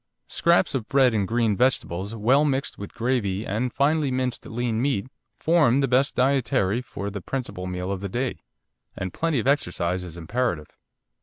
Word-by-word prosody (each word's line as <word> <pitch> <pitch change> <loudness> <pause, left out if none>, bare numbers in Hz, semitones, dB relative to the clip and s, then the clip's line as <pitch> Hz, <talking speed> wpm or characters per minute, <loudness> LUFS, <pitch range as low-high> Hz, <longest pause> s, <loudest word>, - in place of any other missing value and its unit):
Scraps 170 -2 +2
of 125 -5 -2
bread 135 -3 +4
and 100 -3 0
green 115 -1 +1
vegetables 105 -4 0
well 125 +7 +3
mixed 140 -2 -1
with 100 - -8
gravy 110 -5 -1
and 115 +5 -1
finely 145 +2 +2
minced 130 -1 -2
lean 115 -1 -1
meat 125 -7 0 0.3
form 155 -6 +3
the 135 - +2
best 130 +2 +2
dietary 125 -5 +2
for 100 -3 -6
the 100 -1 -5
principal 95 -5 -4
meal 90 +1 -3
of 95 -1 -3
the 100 - -4
day, 125 +5 -2 0.6
and 95 -1 -4
plenty 165 -3 0
of 115 - -3
exercise 90 -10 0
is 85 -2 -9
imperative. 85 -3 -2
120 Hz, 170 wpm, -25 LUFS, 100-135 Hz, 0.6 s, bread